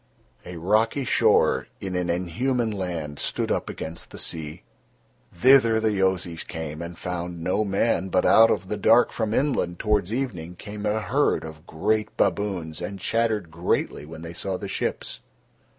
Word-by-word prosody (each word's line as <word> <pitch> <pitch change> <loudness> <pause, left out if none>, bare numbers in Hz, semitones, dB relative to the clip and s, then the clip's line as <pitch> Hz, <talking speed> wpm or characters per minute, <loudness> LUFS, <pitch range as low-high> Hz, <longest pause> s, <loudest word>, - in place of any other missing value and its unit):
A 90 -1 -7
rocky 110 - +1
shore - - +3
in 95 -2 -4
an 90 -1 -1
inhuman 110 +8 0
land 85 -7 -4
stood - - -1
up - - -1
against 80 +1 -5
the - - -10
sea. 80 -2 -3 0.7
Thither 115 +2 +5
the 110 -1 +1
Yozis 95 -4 0
came 80 -2 -6
and 85 0 -7
found 90 -1 -5
no 95 +5 +1
man, 100 -1 0
but - - +2
out 115 0 +7
of 95 -3 0
the 105 - -3
dark 115 +2 +5
from 110 -2 -2
inland 115 -10 0
towards 105 -2 0
evening 95 -10 -3
came 105 +3 -6
a 110 +1 0
herd 140 - +1
of 80 +1 -10
great 105 +6 -1
baboons 90 -7 -1
and 100 -1 -5
chattered 110 -4 0
greatly 85 -2 -1
when 80 +2 -10
they 85 0 -7
saw 95 +2 -2
the 100 - -6
ships. - - -3
95 Hz, 165 wpm, -25 LUFS, 85-110 Hz, 0.7 s, out